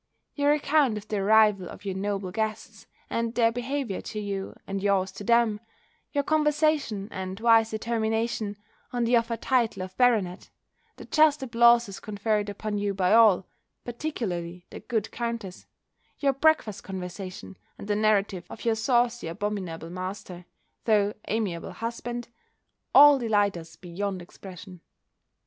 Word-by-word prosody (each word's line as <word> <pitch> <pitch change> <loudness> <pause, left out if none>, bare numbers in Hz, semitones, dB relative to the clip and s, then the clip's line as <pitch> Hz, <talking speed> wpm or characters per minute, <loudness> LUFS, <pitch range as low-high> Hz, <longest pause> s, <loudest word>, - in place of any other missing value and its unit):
Your 285 0 +2
account 285 -5 +2
of 210 0 -9
the 215 - -2
arrival 210 -2 +4
of - - -12
your 195 - -2
noble 195 -1 -3
guests, 220 +1 -4 0.2
and 230 0 -2
their 230 -1 +4
behaviour 245 -3 -3
to 215 - -6
you, 200 -2 -4
and 195 0 -4
yours 195 -2 +1
to 195 - -9
them; 235 -1 +3 0.5
your 285 -1 0
conversation, 300 -8 +1
and 190 +1 -5
wise 225 -1 +5
determination, 220 -1 -2 0.3
on 245 -1 -1
the 235 +1 +3
offered 230 -1 0
title 235 -7 +1
of 185 0 -9
Baronet; 215 -8 +2 0.5
the - - -11
just 305 -2 +3
applauses 235 -4 +4
conferred 210 0 -1
upon 205 0 -3
you 200 -1 -1
by 185 0 +2
all, 215 -5 +6 0.4
particularly 185 - -4
the - - -8
good 220 -3 -3
countess; 230 -6 -5 0.5
your 275 -2 +1
breakfast 275 -7 +1
conversation, 185 0 -7 0.2
and - - -9
the 205 - +1
narrative 205 -4 +1
of - - -10
your 230 - +3
saucy 240 -1 +1
abominable 180 -3 -4
master, 185 -1 -6 0.4
though 210 -2 +3
amiable 200 -6 -2
husband; 240 +1 -5 0.7
all 290 -1 +9
delight 205 -4 +2
us 165 -1 -10
beyond 185 +3 -4
expression. 180 0 -11
215 Hz, 140 wpm, -26 LUFS, 195-235 Hz, 0.7 s, all